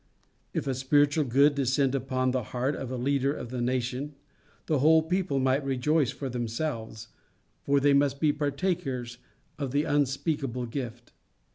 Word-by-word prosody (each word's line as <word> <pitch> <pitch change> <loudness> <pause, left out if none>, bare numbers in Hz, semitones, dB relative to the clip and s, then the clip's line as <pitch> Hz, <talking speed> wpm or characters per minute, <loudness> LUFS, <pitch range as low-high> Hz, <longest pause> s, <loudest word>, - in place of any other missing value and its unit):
If - - -2
a 135 - 0
spiritual 145 +3 +2
good 140 +4 +4
descend 135 0 +1
upon 130 -1 0
the 130 0 0
heart 125 +5 -2
of 130 - -5
a 130 - -3
leader 135 +2 +1
of 120 - -7
the 125 -1 -3
nation, 130 +3 -2 0.5
the 155 -3 +1
whole 160 +3 +5
people 180 -2 -1
might 135 +1 +2
rejoice 135 +1 +1
for 140 - -5
themselves, 115 -2 -4 0.5
for 140 0 +2
they 140 +1 +4
must 140 0 +2
be 150 -1 +3
partakers 145 -5 -2 0.4
of 140 -2 -2
the 145 +3 +1
unspeakable 140 -3 -1
gift. 120 -1 -6
135 Hz, 155 wpm, -28 LUFS, 125-145 Hz, 0.5 s, whole